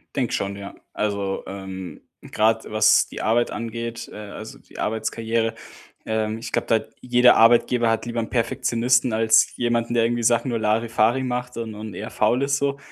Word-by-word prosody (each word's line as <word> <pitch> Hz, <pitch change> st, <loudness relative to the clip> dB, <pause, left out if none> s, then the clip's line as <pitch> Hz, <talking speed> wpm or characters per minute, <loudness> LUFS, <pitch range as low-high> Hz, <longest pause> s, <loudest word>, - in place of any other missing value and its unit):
Denke 125 Hz, -4 st, -1 dB
schon, 100 Hz, 0 st, -2 dB
ja. 100 Hz, 0 st, -9 dB, 0.2 s
Also, 100 Hz, -2 st, -2 dB
ähm, 95 Hz, -2 st, -8 dB, 0.3 s
grade 110 Hz, +1 st, +1 dB
was 110 Hz, 0 st, +4 dB
die -, -, -7 dB
Arbeit 120 Hz, +2 st, +2 dB
angeht, 115 Hz, 0 st, -5 dB
äh, -, -, -11 dB
also 105 Hz, +1 st, -9 dB
die -, -, -18 dB
Arbeitskarriere, 110 Hz, +1 st, -1 dB, 0.5 s
ähm, 110 Hz, 0 st, -1 dB
ich 120 Hz, +1 st, -7 dB
glaube, -, -, -1 dB
da -, -, +3 dB
hat 110 Hz, 0 st, -2 dB
jeder 125 Hz, 0 st, +5 dB
Arbeitgeber 115 Hz, +1 st, +4 dB
hat 115 Hz, 0 st, 0 dB
lieber 120 Hz, 0 st, -3 dB
'n 115 Hz, -, -3 dB
Perfektionisten 120 Hz, +1 st, +1 dB
als 110 Hz, 0 st, +3 dB
jemanden, 120 Hz, -1 st, -1 dB
der 115 Hz, -1 st, +3 dB
irgendwie 120 Hz, 0 st, -1 dB
Sachen 120 Hz, +2 st, +2 dB
nur 115 Hz, -, -1 dB
larifari 115 Hz, +3 st, +1 dB
macht 125 Hz, -1 st, -3 dB
und 115 Hz, -2 st, -5 dB
und 105 Hz, -1 st, -8 dB
eher -, -, -6 dB
faul 125 Hz, +3 st, +1 dB
ist 140 Hz, 0 st, +1 dB
so. 140 Hz, 0 st, -1 dB
115 Hz, 180 wpm, -23 LUFS, 110-120 Hz, 0.5 s, jeder